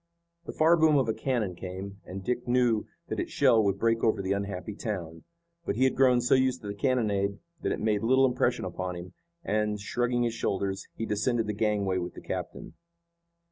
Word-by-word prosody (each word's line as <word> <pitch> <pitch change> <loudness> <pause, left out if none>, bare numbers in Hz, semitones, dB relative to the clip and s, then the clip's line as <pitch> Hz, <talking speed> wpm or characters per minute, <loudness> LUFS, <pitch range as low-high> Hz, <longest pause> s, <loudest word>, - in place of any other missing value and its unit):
The - - -3
far 165 +2 +4
boom 160 -2 +5
of 130 -4 +2
a 110 - +1
cannon 115 -9 -1
came, 95 +2 -7
and 95 +1 -7
Dick 125 +3 -2
knew 120 -3 +2 0.2
that - - -2
its - - -2
shell 110 -2 +4
would 100 -1 +1
break 115 +2 +1
over 110 -2 +3
the 95 0 -2
unhappy 100 0 -3
town. 85 -7 -5 0.4
But 135 - -2
he 125 - +2
had 130 - +3
grown 125 -2 +4
so 120 - +2
used 130 -1 +2
to - - -6
the 100 - -3
cannonade 100 -4 0 0.2
that - - -1
it - - -2
made 105 -2 +1
little 130 +3 +4
impression 125 - +1
upon 90 -1 -4
him, 85 +1 -8 0.3
and, 105 0 0
shrugging 120 +4 0
his 120 -1 0
shoulders, 95 -3 -2
he 115 - -3
descended 110 +2 0
the 105 - -2
gangway 100 -3 0
with 90 0 -5
the - - -9
captain. - - -6
105 Hz, 205 wpm, -28 LUFS, 100-125 Hz, 0.4 s, boom